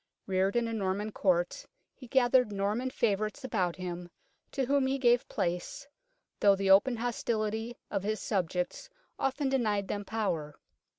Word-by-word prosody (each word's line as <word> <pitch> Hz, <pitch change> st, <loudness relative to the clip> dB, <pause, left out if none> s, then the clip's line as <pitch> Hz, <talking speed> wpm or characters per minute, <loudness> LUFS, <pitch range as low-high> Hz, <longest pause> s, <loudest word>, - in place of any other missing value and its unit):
Reared 190 Hz, +2 st, +1 dB
in 240 Hz, -1 st, +2 dB
a 230 Hz, -, -3 dB
Norman 205 Hz, 0 st, -1 dB
Court, 180 Hz, -4 st, +1 dB, 0.3 s
he 255 Hz, -, -13 dB
gathered 250 Hz, -2 st, +4 dB
Norman 205 Hz, +6 st, -1 dB
favourites 215 Hz, -2 st, -1 dB
about 185 Hz, -9 st, 0 dB
him, 180 Hz, -1 st, -6 dB, 0.4 s
to 270 Hz, -2 st, -1 dB
whom 275 Hz, 0 st, +2 dB
he 270 Hz, +1 st, 0 dB
gave 245 Hz, -2 st, +3 dB
place, 180 Hz, +10 st, -3 dB, 0.5 s
though 200 Hz, -1 st, +6 dB
the 195 Hz, 0 st, +1 dB
open 240 Hz, +6 st, +6 dB
hostility 225 Hz, -1 st, -2 dB
of 195 Hz, -, 0 dB
his 215 Hz, +1 st, -2 dB
subjects 180 Hz, -, -2 dB, 0.3 s
often 270 Hz, +1 st, 0 dB
denied 215 Hz, -7 st, 0 dB
them 205 Hz, -, -2 dB
power. 175 Hz, -9 st, -2 dB
215 Hz, 145 wpm, -30 LUFS, 190-245 Hz, 0.5 s, though